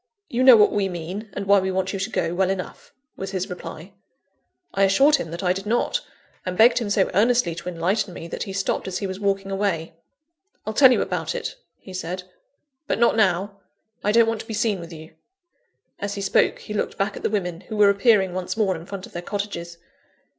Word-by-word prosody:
"You 245 - -1
know 255 -2 +9
what 210 - +5
we 200 -2 0
mean, 180 +5 -6
and 200 - -4
why 200 0 +5
we 190 0 -1
want 190 +1 -1
you 195 - -3
to 190 +3 -2
go, 170 - -1
well 185 +1 +1
enough," 190 -1 -5 0.2
was 195 - -5
his 190 0 -3
reply. 180 +1 -8 0.8
I 195 - 0
assured 270 +10 +5
him 260 - -5
that 170 +4 -6
I 180 0 +3
did 195 +2 -6
not; 240 - +1 0.4
and 180 -1 -4
begged 235 +2 +6
him 225 -4 -3
so 200 -2 +2
earnestly 220 -2 +3
to 170 +2 -6
enlighten 180 +4 -1
me, 170 -1 -8
that - - -6
he 195 - -3
stopped 195 0 -2
as 185 - -3
he 200 - -3
was 190 0 -5
walking 195 -1 -1
away. 195 -5 -1 0.7
"I'll 215 - -3
tell 260 +2 +7
you - - +3
about - - -3
it," - - -4 0.2
he 190 - -12
said; 185 0 -4 0.6
"but - - 0
not 235 -1 +3
now; 200 -1 +1 0.4
I 210 - +2
don't 230 +1 +5
want 225 -1 -1
to - - -13
be 220 - -4
seen 210 -3 0
with 170 0 -9
you." 160 0 -11 0.9
(As 200 0 -3
he 200 - -4
spoke 195 - +2
he 210 - -8
looked 210 - -2
back 195 0 -1
at - - -8
the - - 0
women, 180 -5 -2
who 215 - -4
were 205 -1 +6
appearing 200 -3 +3
once 185 +3 -3
more 200 -4 +2
in 165 +1 -9
front 195 -2 -6
of - - -15
their 175 - -4
cottages.) 175 -3 -5
195 Hz, 225 wpm, -23 LUFS, 180-210 Hz, 0.9 s, know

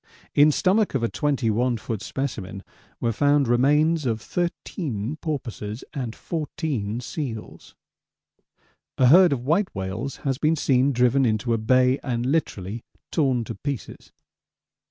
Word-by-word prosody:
In 145 +1 +6
stomach 190 +3 +2
of 125 - 0
a 115 - +1
21 125 -4 0
ft. 110 -1 -5
specimen 105 -7 -4 0.4
were 115 - 0
found 145 +3 +3
remains 150 +5 +3
of 115 -2 0
13 150 - -3
porpoises 120 -8 -5
and 125 -5 -4
14 140 -8 -3
seals. 125 -4 -6 1.2
A 130 -2 +5
herd 180 +3 +7
of 125 -3 -2
white 180 +7 +2
whales 100 +8 -4
has 135 -1 0
been 155 +1 +2
seen 135 -2 +2
driven 125 +1 +3
into 115 0 +1
a 115 - 0
bay 130 +4 +3
and 120 -3 -2
literally 115 - -2 0.3
torn 130 -7 +1
to - - -6
pieces. 140 +3 -6
130 Hz, 135 wpm, -24 LUFS, 115-145 Hz, 1.2 s, herd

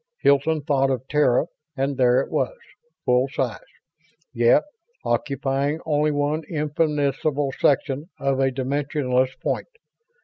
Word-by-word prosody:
Hilton 140 +2 +3
thought 135 -2 +2
of 130 -1 -2
Terra 150 -2 +3 0.3
and 135 +1 0
there 125 -1 +4
it - - -7
was; - - -1 0.5
full 125 +1 +3
size, 130 -3 -2 0.7
yet 120 -1 +4 0.4
occupying 140 +2 -1
only 150 -1 +2
one 145 +2 0
infinitesimal 150 -2 0
section 145 +3 +1
of 135 -1 0
a 135 0 +3
dimensionless 130 -1 -1
point. - - -1
140 Hz, 115 wpm, -23 LUFS, 130-150 Hz, 0.7 s, there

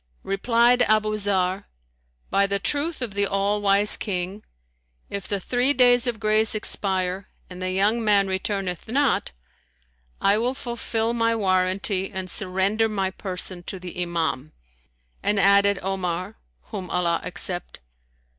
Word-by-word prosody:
Replied 235 +5 +2
Abu 215 -2 +2
Zarr, 195 -2 0 0.7
"By 200 0 +3
the 200 0 0
truth 290 +7 -1
of 225 -5 -5
the 200 0 +1
All 200 +1 0
Wise 200 +1 +4
King, 190 +1 -4 0.7
if 200 -2 -5
the 200 - -1
three 250 +8 +2
days 245 -1 +4
of 235 -3 -2
grace 215 0 +3
expire 190 -2 0 0.2
and 180 0 -9
the 185 - -2
young 205 +5 +1
man 205 -2 +4
returneth 190 -1 -3
not, 270 +3 +1 0.9
I 200 +2 +3
will 250 +3 -1
fulfill 235 -2 -2
my 230 -1 +1
warranty 190 -1 0
and 190 -2 -6
surrender 200 +3 0
my 195 -3 -1
person 185 -1 -4
to 190 - -5
the 180 0 -6
Imam;" 160 -5 -2 0.7
and 205 -1 +1
added 200 0 +5
Omar 185 +1 -3 0.4
(whom 195 -5 -5
Allah 170 -1 0
accept!) 180 - -3
200 Hz, 135 wpm, -24 LUFS, 185-220 Hz, 0.9 s, added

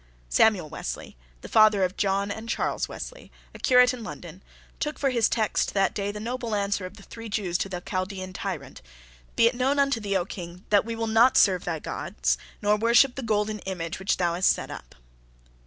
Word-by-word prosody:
Samuel 195 - +3
Wesley, - - -6 0.3
the - - -8
father 215 -3 +5
of 185 +1 0
John 200 0 0
and 220 +3 -6
Charles - - -1
Wesley, - - -9 0.2
a - - -11
curate 250 -1 +5
in 245 -2 -7
London, 180 -4 -9 0.4
took 300 0 -2
for 275 -2 +1
his 235 -3 +2
text 220 -3 0
that 195 -1 +2
day 200 0 -2
the 210 - -7
noble 235 0 -3
answer 200 -2 -1
of - - -14
the 200 - -13
three 230 +1 -9
Jews 200 -5 -2
to 195 - -2
the 180 -2 -5
Chaldean 185 0 -4
tyrant. - - -6 0.5
"Be 230 - +5
it 230 - +4
known 260 +3 +1
unto 275 -4 +2
thee, 200 -2 0
O 175 - -1
King, 180 -1 -9
that 205 0 +4
we 230 0 -4
will 225 0 -2
not 225 +3 +4
serve 185 -3 +4
thy 165 -2 -1
gods, - - -2 0.2
nor 210 +1 +3
worship 235 +4 +4
the 270 - -5
golden 215 -2 0
image 180 -3 -5
which 190 - 0
thou 175 -2 +1
hast 180 +2 +3
set - - -1
up." - - -10
205 Hz, 205 wpm, -26 LUFS, 185-230 Hz, 0.5 s, father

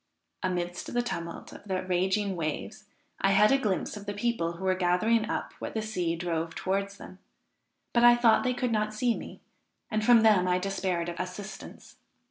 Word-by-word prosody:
Amidst 175 -1 -3
the 245 - +2
tumult 170 -8 -6
of - - -12
the 185 -2 -2
raging 190 +2 0
waves 155 -3 -4 0.3
I 195 0 +3
had 210 +2 +5
a 275 - +4
glimpse 205 -8 -1
of 205 -1 -9
the 205 - -3
people, 205 -6 -1
who 170 +3 -9
were 185 - +3
gathering 195 +5 +2
up - - -3
what - - -6
the 220 - 0
sea 180 -6 -1
drove 165 -1 -3
towards 200 +1 -2
them; 185 - -12 0.7
but 235 - +3
I 240 0 +8
thought 240 -2 +4
they 250 -1 0
could 245 -1 -1
not 215 -1 0
see 235 +1 +1
me, - - -9 0.5
and 215 -1 0
from 235 0 +6
them 210 -5 +4
I 180 0 +3
despaired 185 -2 -2
of 175 - -5
assistance. 185 +3 -8
195 Hz, 190 wpm, -28 LUFS, 180-220 Hz, 0.7 s, I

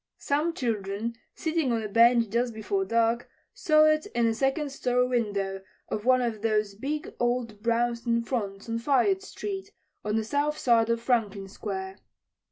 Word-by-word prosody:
Some 305 +4 0
children 220 -1 -2 0.2
sitting 320 -5 0
on 225 -1 0
a - - -2
bench 230 +1 +5
just 235 0 0
before 385 - -1
dark 230 -3 +1 0.2
saw 310 -1 +4
it 310 +4 +2
in 235 - +3
the 225 - +2
second 270 +5 0
story 250 -2 +1
window 200 -6 -1 0.3
of 210 +1 -3
one 255 0 +4
of 225 -3 -2
those 215 -2 +1
big 285 +9 -4
old 240 -3 -1
brownstone 235 0 +1
fronts 205 -5 -3
on 230 0 -2
Fayette 285 +10 +2
street, 390 0 -6 0.3
on 210 0 -1
the 225 - +1
south 290 +6 0
side 230 -2 +3
of 230 0 +1
Franklin 215 -5 0
Square. 190 -1 -5
235 Hz, 165 wpm, -27 LUFS, 215-270 Hz, 0.3 s, bench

